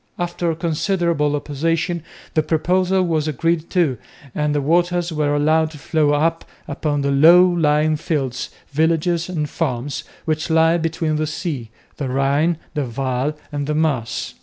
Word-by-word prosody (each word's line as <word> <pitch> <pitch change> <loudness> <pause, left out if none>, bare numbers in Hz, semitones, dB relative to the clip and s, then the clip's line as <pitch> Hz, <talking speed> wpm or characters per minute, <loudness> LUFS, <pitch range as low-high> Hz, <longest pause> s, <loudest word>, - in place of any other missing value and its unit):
After 175 -1 -2
considerable 170 -2 0
opposition 165 +4 -1 0.3
the 155 - +3
proposal 180 +4 +1
was 160 -3 0
agreed 165 +3 0
to 160 - +1 0.3
and 150 -1 0
the - - +2
waters 175 +3 +1
were 150 -1 +1
allowed 155 +2 +2
to 155 - -11
flow 150 0 +1
out 165 +2 +1 0.2
upon 145 -3 -1
the 140 0 0
low 170 +6 +7
lying 155 -3 +2
fields, 135 -6 -2 0.2
villages 165 +3 +1
and 155 -5 -2
farms, 140 -3 -3 0.2
which 155 +1 -1
lie 165 +1 +4
between 165 -1 -1
the 155 0 -1
sea, 150 - -4 0.3
the 140 -3 -3
Rhine, 140 +5 +1 0.2
the 145 -2 -1
Waal 130 +3 -2 0.2
and 145 -1 -3
the 150 - -1
Maas. 145 -7 -1
155 Hz, 150 wpm, -20 LUFS, 145-170 Hz, 0.3 s, low